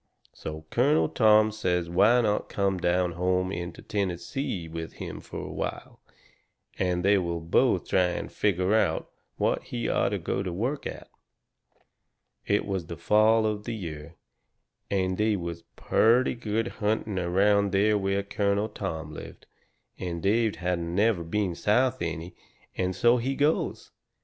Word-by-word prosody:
So 80 Hz, 0 st, -7 dB
Colonel 140 Hz, +6 st, +3 dB
Tom 110 Hz, -2 st, +5 dB
says 90 Hz, -5 st, -1 dB
why 105 Hz, +8 st, +4 dB
not 105 Hz, -2 st, 0 dB
come 100 Hz, -2 st, 0 dB
down 90 Hz, 0 st, +1 dB
home 90 Hz, +2 st, 0 dB
into 85 Hz, -2 st, -6 dB
Tennessee 95 Hz, -, -3 dB
with 80 Hz, 0 st, -6 dB
him -, -, -7 dB
fur -, -, -9 dB
a -, -, -5 dB
while, -, -, -5 dB, 0.8 s
and 90 Hz, -1 st, 0 dB
they 100 Hz, 0 st, +5 dB
will 85 Hz, -2 st, -2 dB
both 80 Hz, 0 st, +2 dB
try 90 Hz, -, +3 dB
and 90 Hz, -, -4 dB
figger 95 Hz, -1 st, +1 dB
out 95 Hz, -8 st, +1 dB, 0.3 s
what -, -, +1 dB
he -, -, -3 dB
orter -, -, +1 dB
go -, -, -2 dB
to 95 Hz, -2 st, -3 dB
work 125 Hz, +11 st, -2 dB
at. -, -, -8 dB, 1.4 s
It 100 Hz, 0 st, +2 dB
was 95 Hz, -4 st, -3 dB
the 85 Hz, -, -6 dB
fall 110 Hz, +5 st, +4 dB
of 105 Hz, -1 st, -2 dB
the 120 Hz, -, -3 dB
year, 80 Hz, -4 st, -7 dB, 0.7 s
and 95 Hz, -1 st, 0 dB
they 105 Hz, 0 st, +2 dB
was 85 Hz, -2 st, -5 dB
purty 120 Hz, +4 st, +3 dB
good 115 Hz, -1 st, -2 dB
hunting 105 Hz, -2 st, -1 dB
around 100 Hz, +3 st, +2 dB
there 105 Hz, +2 st, +3 dB
where 100 Hz, 0 st, 0 dB
Colonel 100 Hz, +1 st, 0 dB
Tom 80 Hz, -5 st, -5 dB
lived, -, -, -10 dB, 0.5 s
and 85 Hz, -2 st, -3 dB
Dave 110 Hz, +2 st, +2 dB
hadn't 85 Hz, -1 st, -2 dB
never 100 Hz, -3 st, +2 dB
been 95 Hz, +2 st, -1 dB
South 125 Hz, +8 st, +1 dB
any, 85 Hz, +1 st, -4 dB, 0.4 s
and 90 Hz, 0 st, -1 dB
so 120 Hz, +6 st, +4 dB
he 130 Hz, +3 st, -1 dB
goes. 145 Hz, +3 st, 0 dB
95 Hz, 150 wpm, -27 LUFS, 85-110 Hz, 1.4 s, Tom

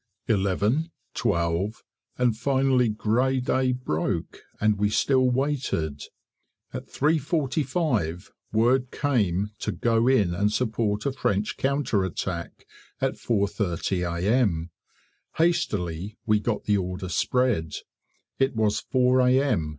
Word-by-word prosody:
Eleven, 105 Hz, -, +1 dB, 0.2 s
twelve, 85 Hz, +6 st, -1 dB, 0.3 s
and 125 Hz, -3 st, +2 dB
finally 130 Hz, 0 st, +2 dB
grey 120 Hz, +5 st, +1 dB
day 130 Hz, +1 st, +1 dB
broke, 85 Hz, -8 st, -2 dB, 0.2 s
and 105 Hz, -1 st, +2 dB
we 105 Hz, 0 st, +2 dB
still 130 Hz, +3 st, +3 dB
waited. 125 Hz, -, -1 dB, 0.7 s
At -, -, -6 dB
3.45 140 Hz, -, 0 dB, 0.2 s
word 125 Hz, +4 st, +2 dB
came 105 Hz, -, 0 dB
to -, -, -2 dB
go 115 Hz, 0 st, +1 dB
in 105 Hz, -10 st, +3 dB
and 100 Hz, +4 st, +1 dB
support 110 Hz, -3 st, -1 dB
a 140 Hz, -, +1 dB
French 105 Hz, -5 st, -1 dB
counterattack 120 Hz, -, -2 dB, 0.3 s
at -, -, 0 dB
4.30 90 Hz, -5 st, -1 dB
A.M. 100 Hz, -8 st, +1 dB, 0.6 s
Hastily 105 Hz, -, 0 dB
we 105 Hz, -1 st, +3 dB
got 105 Hz, 0 st, -2 dB
the 105 Hz, -1 st, +2 dB
order 90 Hz, 0 st, -3 dB
spread; 90 Hz, -, 0 dB, 0.6 s
it 135 Hz, -1 st, +1 dB
was 110 Hz, -2 st, +1 dB
4 130 Hz, -1 st, +2 dB
A.M. 125 Hz, -, +2 dB
110 Hz, 110 wpm, -25 LUFS, 95-130 Hz, 0.7 s, still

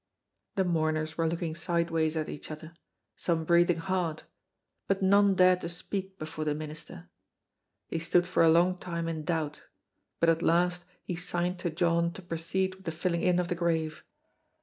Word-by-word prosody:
The 190 Hz, -, +2 dB
mourners 155 Hz, -2 st, 0 dB
were 165 Hz, -1 st, +1 dB
looking 165 Hz, 0 st, -2 dB
sideways 165 Hz, -1 st, 0 dB
at 155 Hz, -, -1 dB
each 145 Hz, -, -7 dB
other, 160 Hz, +1 st, -8 dB, 0.4 s
some 165 Hz, -2 st, -1 dB
breathing 170 Hz, 0 st, +4 dB
hard, 170 Hz, -2 st, -2 dB, 0.6 s
but 195 Hz, 0 st, +1 dB
none 200 Hz, +1 st, +5 dB
dared 185 Hz, 0 st, +5 dB
to 170 Hz, -, -4 dB
speak 190 Hz, +3 st, -4 dB
before 155 Hz, -1 st, -5 dB
the 150 Hz, -1 st, 0 dB
minister. 150 Hz, -, -8 dB, 0.8 s
He 165 Hz, -, -3 dB
stood 175 Hz, +2 st, +3 dB
for 180 Hz, -1 st, +1 dB
a 165 Hz, -, +7 dB
long 175 Hz, +3 st, +4 dB
time 170 Hz, -2 st, -3 dB
in 160 Hz, -2 st, -3 dB
doubt, 155 Hz, -3 st, -2 dB, 0.5 s
but 165 Hz, -, +3 dB
at 165 Hz, 0 st, +2 dB
last 175 Hz, +1 st, +2 dB, 0.2 s
he 180 Hz, -, -4 dB
signed 175 Hz, +1 st, -1 dB
to 175 Hz, -, -1 dB
John 170 Hz, 0 st, +1 dB
to 190 Hz, -, -10 dB
proceed 175 Hz, +3 st, -1 dB
with 190 Hz, 0 st, -18 dB
the 165 Hz, -, -1 dB
filling 170 Hz, +1 st, -1 dB
in 180 Hz, -1 st, +3 dB
of 180 Hz, -1 st, +1 dB
the 175 Hz, -, 0 dB
grave. 165 Hz, -2 st, -1 dB
170 Hz, 175 wpm, -29 LUFS, 160-180 Hz, 0.8 s, a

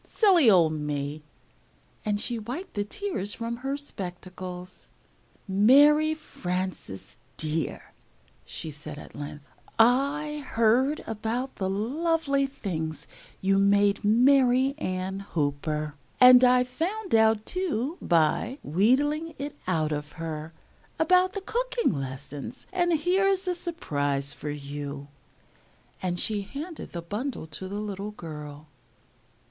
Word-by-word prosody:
Silly 365 Hz, -, +5 dB
old 170 Hz, -6 st, +5 dB
me!" 150 Hz, 0 st, -3 dB, 0.8 s
and 210 Hz, -2 st, 0 dB
she 235 Hz, +1 st, -1 dB
wiped 250 Hz, -, -6 dB
the 205 Hz, -, -1 dB
tears 215 Hz, -, -3 dB
from 235 Hz, 0 st, -4 dB
her 270 Hz, +3 st, -3 dB
spectacles. 185 Hz, -6 st, -8 dB, 0.6 s
"Mary 290 Hz, +10 st, +5 dB
Frances, 185 Hz, -, -5 dB, 0.2 s
dear," 155 Hz, -1 st, -3 dB, 0.5 s
she 160 Hz, -, -6 dB
said, 150 Hz, 0 st, -8 dB
at -, -, -11 dB
length, 145 Hz, 0 st, -7 dB, 0.3 s
"I 280 Hz, +5 st, +2 dB
heard 250 Hz, +6 st, +2 dB
about 225 Hz, +4 st, -3 dB
the 190 Hz, -2 st, -1 dB
lovely 275 Hz, -, +1 dB
things 160 Hz, -, -4 dB, 0.4 s
you 195 Hz, +1 st, +3 dB
made 200 Hz, 0 st, +3 dB
Mary 255 Hz, +4 st, +4 dB
Ann 185 Hz, -1 st, -3 dB
Hooper; 150 Hz, -4 st, -2 dB, 0.3 s
and 250 Hz, 0 st, +9 dB
I 250 Hz, 0 st, +6 dB
found 350 Hz, -, -3 dB
out, 220 Hz, -1 st, +4 dB
too, 335 Hz, -, -2 dB
by 170 Hz, -, +2 dB
wheedlin' 290 Hz, -, +2 dB
it 285 Hz, +1 st, -5 dB
out 160 Hz, -4 st, +1 dB
of 150 Hz, 0 st, -4 dB
her, 160 Hz, -1 st, -5 dB, 0.5 s
about 365 Hz, +3 st, +4 dB
the 400 Hz, -, -4 dB
cooking 480 Hz, +3 st, 0 dB
lessons 140 Hz, -, -6 dB
and 350 Hz, -1 st, +2 dB
here's 375 Hz, +4 st, +2 dB
a 360 Hz, -, +2 dB
surprise 145 Hz, -, -2 dB
for 150 Hz, -, -6 dB
you," 145 Hz, 0 st, -6 dB, 0.9 s
and 180 Hz, -1 st, -1 dB
she 210 Hz, -2 st, 0 dB
handed 295 Hz, -, -7 dB
the 170 Hz, -1 st, -5 dB
bundle 210 Hz, -, -4 dB
to 160 Hz, +4 st, -7 dB
the 200 Hz, -, -6 dB
little 205 Hz, -1 st, -4 dB
girl. 150 Hz, -6 st, -8 dB
210 Hz, 120 wpm, -27 LUFS, -, 0.9 s, and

